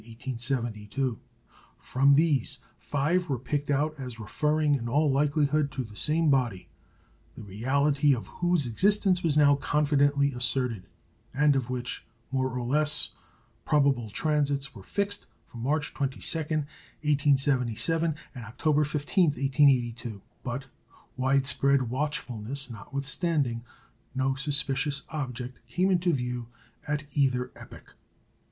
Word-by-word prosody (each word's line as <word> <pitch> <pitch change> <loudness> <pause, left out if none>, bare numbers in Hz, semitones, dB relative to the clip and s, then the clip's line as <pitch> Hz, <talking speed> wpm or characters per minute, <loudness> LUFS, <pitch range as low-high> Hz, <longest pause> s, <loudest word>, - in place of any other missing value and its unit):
From 140 +2 +3
these, 145 -3 +2 0.2
five 165 +5 0
were 135 - 0
picked 145 +4 -3
out 145 +1 0
as 125 -3 -7
referring 150 +7 +1
in 120 -4 -1
all 145 +3 +3
likelihood 145 +1 +2
to 130 - -2
the 110 -3 -12
same 155 +6 +2
body, 120 -9 0 0.7
the - - -9
reality 140 +7 +2
of 115 - -6
whose 175 -4 0
existence 185 - +2
was 155 -3 +1
now 145 -1 +6
confidently 145 -1 +2
asserted, 125 -4 -1 0.5
and 145 0 +4
of 130 -2 -1
which 125 0 -4 0.3
more 130 -1 0
or 125 -1 -4
less 150 +3 +2 0.5
probable 140 -6 +2
transits 140 +2 0
were 100 - -11
fixed 200 - -2 0.2
for 120 - -12
March 145 +5 -1
22, 135 -3 -2 0.3
1877, 145 0 0 0.2
and 125 -4 -8
October 150 +7 +1
15, 150 +5 +1
1882. 125 - +1 0.2
But, 130 +2 -4 0.5
widespread 135 -1 +2
watchfulness 130 -2 -2
notwithstanding, 140 - -2 0.5
no 130 0 +1
suspicious 140 0 0
object 125 -4 -5
came 180 +10 +1
into 180 -1 +2
view 125 -4 -2 0.4
at 150 0 -1
either 130 -3 +1
epoch. - - -13
140 Hz, 115 wpm, -28 LUFS, 125-150 Hz, 0.7 s, now